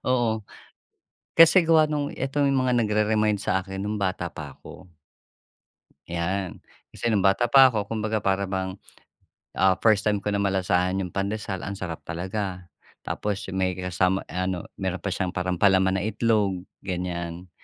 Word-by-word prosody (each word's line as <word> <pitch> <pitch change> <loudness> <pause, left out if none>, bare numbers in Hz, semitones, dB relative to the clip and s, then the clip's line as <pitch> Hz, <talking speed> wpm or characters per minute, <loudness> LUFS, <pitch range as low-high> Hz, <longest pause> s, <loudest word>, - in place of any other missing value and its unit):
Oo, 120 -3 +1 0.9
kasi 165 +1 +7
gawa 155 -2 +5
nung 145 -1 -1
ito 135 +2 -3
yung 140 -1 +3
mga 125 -1 +1
nagre-remind 105 -1 +1
sa'kin 95 +1 -2
no'ng 105 +1 -2
bata 95 -2 -2
pa - - -8
ako. 90 -1 -14 1.2
Yan, 90 +2 -3 0.3
kasi 120 - -1
no'ng 100 -3 +2
bata 95 +5 +3
pa 135 0 +9
ako. 110 -5 -1
Kumbaga 110 -1 -1
para 100 0 +1
bang, 95 0 -3 0.8
ah, 95 -1 +5
first 110 -2 +3
time 105 -2 +1
ko 105 - -2
na 100 - 0
malasahan 95 -1 +1
yung 90 - -4
pandesal, 100 0 -3
ang 100 - -4
sarap 90 -4 -6
talaga. 90 +1 -4 0.3
Tapos, 105 0 -3
yung 95 - -4
may 90 -1 +1
kasama, 90 +1 0
ah, 90 0 -2
ano, 95 -2 -2 0.2
meron 95 -2 -3
pa 100 - -2
siyang 90 0 -2
parang 90 0 -1
palaman 95 0 +3
na - - -3
itlog, 105 -4 +1 0.2
ganyan. 90 -1 -4
95 Hz, 160 wpm, -25 LUFS, 95-110 Hz, 1.2 s, pa